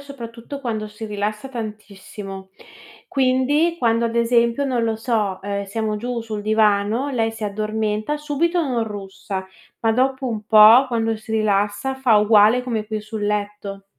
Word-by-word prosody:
soprattutto 270 -1 -9
quando 220 -5 -3
si 215 +1 -8
rilassa 210 +4 -3
tantissimo. 205 -4 -8 0.6
Quindi, 275 +5 +2
quando 230 -2 +2
ad 230 0 -2
esempio, 235 +3 +2
non 245 -3 0
lo 225 -1 -1
so, 220 -5 -1
ehm, 200 0 -3
siamo 215 +2 -2
giù 240 +2 -3
sul 215 -2 -5
divano 215 +3 +2
lei 225 -5 0
si 225 -1 -6
addormenta, 215 +5 -2
subito 330 +4 0
non 250 -6 -1
russa, 195 -2 -6 0.3
ma 225 - +2
dopo 260 +2 0
un 215 -2 -4
po' 220 +4 +8
quando 225 -2 -1
si 220 +1 -9
rilassa 210 +4 0
fa 260 -4 +3
uguale 210 +3 +5
come 230 -4 -2
qui 215 0 -3
sul 215 0 -5
letto. 205 -1 -3
220 Hz, 155 wpm, -21 LUFS, 210-245 Hz, 0.6 s, po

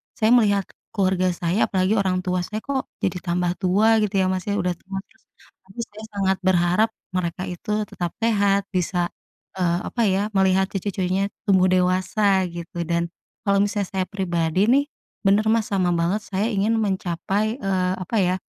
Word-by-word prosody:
saya 220 +1 +2
melihat 205 -5 +4 0.3
keluarga 185 -2 +2
saya, 175 +5 +1
apalagi 185 0 +1
orang 185 -1 0
tua 180 0 0
saya, 215 +5 -4
kok 275 -2 -2 0.2
jadi 180 -1 0
tambah 175 0 0
tua 210 +4 +4
gitu 210 -1 -1
ya, 190 - +3
Mas, 185 0 -3
ya, 205 - 0
udah 180 -2 0
tua. 195 +1 -9
Terus - - -31 0.4
tapi 195 +5 -13
saya 215 -1 -12
sangat 190 -1 +1
berharap 180 +4 +3 0.2
mereka 180 -1 -2
itu 210 +4 -2
tetap 175 -4 -5
sehat, 200 -3 +3
bisa, 180 -1 0 0.5
eee, 175 -1 +2
apa 240 - -3
ya, 195 +1 +2
melihat 190 -1 +2
cucu-cucunya 195 0 -1 0.2
tumbuh 190 -2 +4
dewasa 185 +1 +2
gitu. 170 0 -8
Dan 170 0 -1 0.3
kalau 200 -1 +2
misalnya 205 -1 0
saya 190 -1 -1
pribadi 185 +2 +1
nih, 280 +2 +5 0.4
bener, 205 +2 +4
Mas, 225 -2 +1
sama 185 -3 +1
banget. 175 +5 0
Saya 200 +1 -1
ingin 220 +3 +2
mencapai, 200 +3 -1
eee, 185 -3 0
apa 185 +5 -4
ya, 180 0 +2
190 Hz, 170 wpm, -23 LUFS, 180-205 Hz, 0.5 s, nih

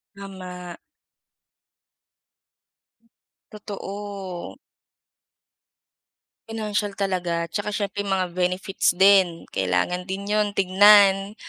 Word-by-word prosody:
Tama. 185 -3 -9 2.7
Totoo. 200 -3 -7 1.9
Financial 210 -2 -3
talaga. 175 -4 -2
Tsaka 210 0 -3
siyempre 205 -1 -3
mga 185 -2 -1
benefits 180 +1 0
din, 190 -3 +4
kailangan 95 - -1
din 195 +2 -5
'yon 210 -1 +1
tignan, 195 +1 +5
195 Hz, 70 wpm, -23 LUFS, 180-205 Hz, 2.7 s, tignan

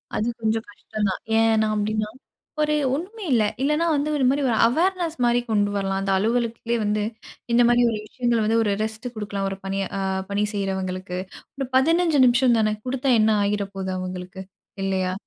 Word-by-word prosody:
அது 215 - 0
கொஞ்சம் 220 0 0
கஷ்டம் 210 0 -3
தான். 185 - -4 0.2
ஏன்னா 225 -1 +3
அப்படின்னா, 215 0 -1 0.5
ஒரு 300 0 +2 0.2
ஒண்ணுமே 405 +7 -6
இல்ல. 225 - +4 0.2
இல்லன்னா, 300 +4 +2
வந்து 290 +2 0
ஒரு 270 - 0
மாதிரி 280 +2 +1
ஒரு 225 - +1
அவேர்னஸ் 340 +5 0
மாரி 240 0 +3
கொண்டு 205 -1 +2
வரலாம். 195 -1 -1
அந்த 195 0 -1
அலுவலகத்லயே 230 +2 0
வந்து 210 0 0 0.5
இந்த 240 +1 +5
மாரி 240 0 +4
ஒரு 215 - -3
விஷயங்கள 240 0 0
வந்து 225 +1 +2
ஒரு 205 -2 +1
ரெஸ்ட் 220 +2 -4
குடுக்கலாம். 200 -2 -3
ஒரு 195 - -5
பணியை 195 0 -2
அ - - -2 0.3
பணி 205 +1 +1
செய்றவங்களுக்கு. 190 -2 -3 0.4
ஒரு 270 - -3
15 325 +2 +3
நிமிஷம் 240 -1 +4
தானே 215 -1 +2
குடுத்தா 260 +1 0
என்ன 215 +1 +4
ஆகிற 200 0 0
போகுது 190 -1 -3
அவங்களுக்கு? 185 +1 -6 0.4
இல்லையா! 190 -1 0
220 Hz, 175 wpm, -23 LUFS, 200-250 Hz, 0.5 s, இந்த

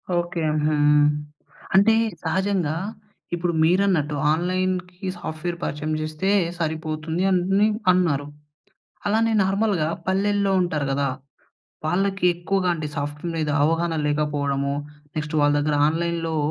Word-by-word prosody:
Okay. 175 0 -1 0.2
హుహు. 155 - +2 1.0
అంటే 200 +3 +6 0.3
సహజంగా 180 -2 0 0.6
ఇప్పుడు 175 0 -1
మీరన్నట్టు 170 -4 +2 0.2
ఆన్లైన్‌కి 180 +2 -1
సాఫ్ట్‌వేర్ 170 +2 -4
పరిచయం 150 +1 -2
చేస్తే 155 +5 -2 0.3
సరిపోతుంది 160 +1 -2
అని 195 +3 +3 0.2
అన్నారు. 160 -6 +1 0.8
అలానే 225 +2 +2
నార్మల్‌గా 195 -4 +1 0.2
పల్లెల్లో 200 +1 +1
ఉంటారు 160 -5 -1
గదా! 140 +1 +1 0.8
వాళ్ళకి 195 +4 0
ఎక్కువగా 180 +2 0
అంటే 155 -3 -4
సాఫ్ట్‌వేర్ 145 +4 -4
మీద 155 -2 -1
అవగాహన 165 +2 +1
లేకపోవడము. 145 -2 0 0.4
నెక్స్ట్ 150 0 -3
వాళ్ళ 145 0 +4
దగ్గర 145 0 +1
ఆన్లైన్‌లో 165 0 -1
170 Hz, 105 wpm, -23 LUFS, 155-185 Hz, 1.0 s, అంటే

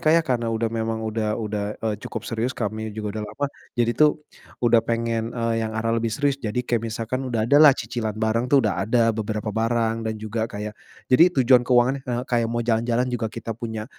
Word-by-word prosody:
Kak 155 - +3
ya, 170 - +4
karena 120 -4 0
udah 115 0 0
memang 115 0 -2
udah 110 -1 -1
udah, 105 -2 -3 0.2
eee, 110 -1 0
cukup - - -6
serius, 115 +3 -2
kami 110 0 -3
juga 105 0 -4
udah - - -4
lama. 145 - -3 0.3
Jadi 120 -1 +2
tuh 150 +2 +2 0.4
udah 115 -1 +5
pengen, 115 0 -1
eee, 115 -1 0
yang 110 0 -3
arah 115 +1 0
lebih 115 - 0
serius. 140 +5 0
Jadi 115 +2 -2
kayak 120 -2 0
misalkan 120 +4 -3
udah 115 -3 0
ada 145 +6 +5
lah 150 -4 +8
cicilan 110 -2 -4
bareng 110 +3 0
tuh 135 -2 +4
udah 95 -1 -1
ada 115 -1 +3
beberapa 105 0 -3
barang 115 +1 +1
dan 110 - -2
juga 110 +1 -3
kayak 105 0 -5 0.4
jadi 165 +7 +7 0.2
tujuan 125 0 +6
keuangannya, 125 +2 +2
eee, 120 0 -1
kayak 120 -2 +1
mau 120 0 -2
jalan-jalan 115 +1 +1
juga 115 -2 -1
kita 115 +1 -6
punya 110 -1 -5
115 Hz, 210 wpm, -23 LUFS, 110-120 Hz, 0.4 s, lah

